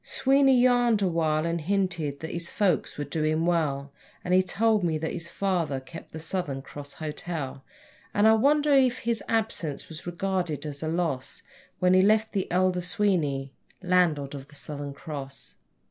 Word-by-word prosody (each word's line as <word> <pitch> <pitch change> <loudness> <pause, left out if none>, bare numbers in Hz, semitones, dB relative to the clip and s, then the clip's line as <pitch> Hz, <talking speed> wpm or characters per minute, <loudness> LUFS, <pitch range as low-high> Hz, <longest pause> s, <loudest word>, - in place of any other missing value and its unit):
Sweeney 270 -1 +3
yarned 245 -4 +4
awhile 160 -3 +1
and 170 0 -1
hinted 170 -5 -1
that 160 - -5
his 170 0 -4
folks 190 -6 0
were 145 - -2
doing 155 +2 0
well, 140 -5 0 0.3
And 180 - 0
he 185 - +6
told 210 +2 +2
me 165 -2 +1
that 160 +1 -3
his 170 -1 -4
father 175 -9 -1
kept 165 +5 -11
the - - -7
Southern 160 -4 -3
Cross 145 0 -8
Hotel; 150 -3 -5 0.5
And 205 +1 +4
I 220 - +7
wondered 285 +4 +4
if 255 0 +1
his 230 -2 -1
absence 215 -10 -1
was 160 +1 -9
regarded 175 -3 -2
as 145 -2 -5
a 160 - -2
loss 160 -6 -2 0.3
When 180 0 +3
he 185 - +6
left 215 +2 +3
the 195 -3 -2
elder 180 0 +2
Sweeney 165 -9 0 0.3
landlord 170 -6 +2
of 140 -1 -8
the 150 - -15
Southern 145 -1 -6
Cross. 140 -2 -7
170 Hz, 170 wpm, -27 LUFS, 150-195 Hz, 0.5 s, I